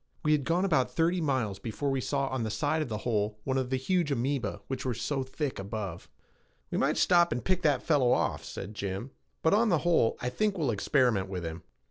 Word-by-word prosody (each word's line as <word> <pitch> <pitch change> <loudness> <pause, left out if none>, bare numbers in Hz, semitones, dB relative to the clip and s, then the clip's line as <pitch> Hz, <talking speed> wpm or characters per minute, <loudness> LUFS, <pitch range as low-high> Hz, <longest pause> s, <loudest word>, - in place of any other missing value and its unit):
We 150 - +2
had 145 -3 +2
gone 175 +3 +2
about 155 -9 +2
thirty 170 +2 +1
miles 130 -10 0
before 135 +5 -2
we 135 -1 0
saw 140 +2 0
on 130 -1 -2
the 110 - -1
side 150 +8 0
of 150 - -3
the 110 - -2
hole 105 -3 0
one 135 0 0
of 130 -1 -2
the 130 - +1
huge 170 +3 0
amoeba 135 +1 -1
which 135 - -4
were 125 -3 -1
so 135 +5 -2
thick 130 0 -3
above. 100 -3 -5 0.6
"We - - 0
might - - +2
stop 175 -1 +4
and 120 - -2
pick 185 -1 +1
that 150 -4 +2
fellow 140 -6 +3
off," - - +1
said 105 - -7
Jim, 100 +4 -4 0.3
"but, 160 - +4
on 220 +2 +4
the 175 - +4
whole, 165 -10 +3
I 125 - -2
think 205 +9 0
we'll 150 -7 +1
experiment 110 -3 +2
with 90 -3 -4
him." 80 +1 -5
130 Hz, 225 wpm, -29 LUFS, 110-155 Hz, 0.6 s, stop